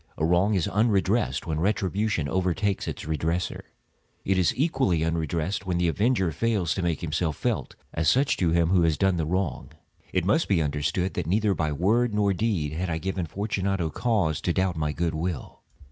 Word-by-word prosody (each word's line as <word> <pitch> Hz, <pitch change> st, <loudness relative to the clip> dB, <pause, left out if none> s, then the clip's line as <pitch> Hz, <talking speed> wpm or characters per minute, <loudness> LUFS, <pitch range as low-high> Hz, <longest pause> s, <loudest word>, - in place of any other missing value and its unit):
A 80 Hz, -, +1 dB
wrong 90 Hz, +5 st, +3 dB
is 90 Hz, -, +1 dB
unredressed 105 Hz, +1 st, +1 dB
when 80 Hz, -3 st, -2 dB
retribution 100 Hz, -2 st, 0 dB
overtakes 95 Hz, +4 st, 0 dB
its -, -, -5 dB
redresser. 80 Hz, +3 st, -2 dB, 0.6 s
It 95 Hz, -1 st, +2 dB
is 90 Hz, -, +3 dB
equally 130 Hz, -, +1 dB
unredressed 80 Hz, +3 st, -2 dB
when 90 Hz, -2 st, 0 dB
the 90 Hz, 0 st, +2 dB
avenger 95 Hz, 0 st, +1 dB
fails 100 Hz, -4 st, 0 dB
to 95 Hz, -, -3 dB
make 85 Hz, -2 st, -1 dB
himself 80 Hz, -2 st, -1 dB
felt -, -, -2 dB, 0.2 s
as 80 Hz, -1 st, +2 dB
such 135 Hz, -, +3 dB
to 90 Hz, -, +1 dB
him 85 Hz, 0 st, +2 dB
who 90 Hz, -1 st, +4 dB
has 80 Hz, -2 st, +2 dB
done 95 Hz, -2 st, +2 dB
the 80 Hz, -2 st, -1 dB
wrong. 90 Hz, -5 st, -2 dB, 0.4 s
It -, -, 0 dB
must -, -, +2 dB
be -, -, +2 dB
understood, 75 Hz, +5 st, -1 dB
that 85 Hz, -3 st, -3 dB
neither 105 Hz, +3 st, +2 dB
by 80 Hz, -3 st, -1 dB
word 105 Hz, +9 st, +1 dB
nor 100 Hz, -1 st, +2 dB
deed 90 Hz, -8 st, -1 dB
had 90 Hz, +3 st, -2 dB
I 80 Hz, -, -1 dB
given 95 Hz, 0 st, -3 dB
Fortunato 95 Hz, -3 st, -2 dB
cause 100 Hz, -10 st, 0 dB
to 90 Hz, -, 0 dB
doubt 95 Hz, -1 st, 0 dB
my 75 Hz, -1 st, -1 dB
good 85 Hz, +1 st, -1 dB
will. 80 Hz, -1 st, -4 dB
90 Hz, 190 wpm, -26 LUFS, 80-100 Hz, 0.6 s, who